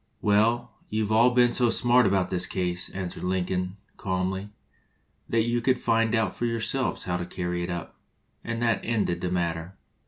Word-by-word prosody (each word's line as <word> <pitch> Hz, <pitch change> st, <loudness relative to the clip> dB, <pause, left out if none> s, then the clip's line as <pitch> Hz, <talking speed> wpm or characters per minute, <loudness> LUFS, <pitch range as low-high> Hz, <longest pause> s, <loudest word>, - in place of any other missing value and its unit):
"Well, 110 Hz, +3 st, +2 dB, 0.2 s
you 110 Hz, 0 st, 0 dB
've 105 Hz, -, -4 dB
all 115 Hz, +3 st, +6 dB
been 120 Hz, -1 st, +4 dB
so 120 Hz, -2 st, +2 dB
smart 120 Hz, -1 st, +4 dB
about 95 Hz, -2 st, +1 dB
this 90 Hz, -1 st, +1 dB
case," 90 Hz, -1 st, -2 dB
answered 95 Hz, -2 st, -5 dB
Lin 90 Hz, 0 st, 0 dB
coln, 90 Hz, +1 st, -3 dB, 0.2 s
calmly, 95 Hz, +1 st, -2 dB, 0.8 s
"that 115 Hz, -1 st, +2 dB
you 120 Hz, +1 st, 0 dB
can 130 Hz, +2 st, +3 dB
find 115 Hz, -2 st, +1 dB
out 110 Hz, -4 st, 0 dB
for 120 Hz, -, -1 dB
your 115 Hz, 0 st, -1 dB
selves 130 Hz, +4 st, -1 dB
how 90 Hz, -1 st, -1 dB
to 90 Hz, -, -4 dB
carry 90 Hz, -1 st, -3 dB
it 85 Hz, -, -3 dB
up"; 85 Hz, -1 st, -5 dB, 0.5 s
and 115 Hz, 0 st, -3 dB
that 115 Hz, -1 st, +2 dB
ended 105 Hz, -7 st, 0 dB
the 90 Hz, -, -1 dB
matter. 85 Hz, 0 st, -2 dB
100 Hz, 190 wpm, -26 LUFS, 90-115 Hz, 0.8 s, all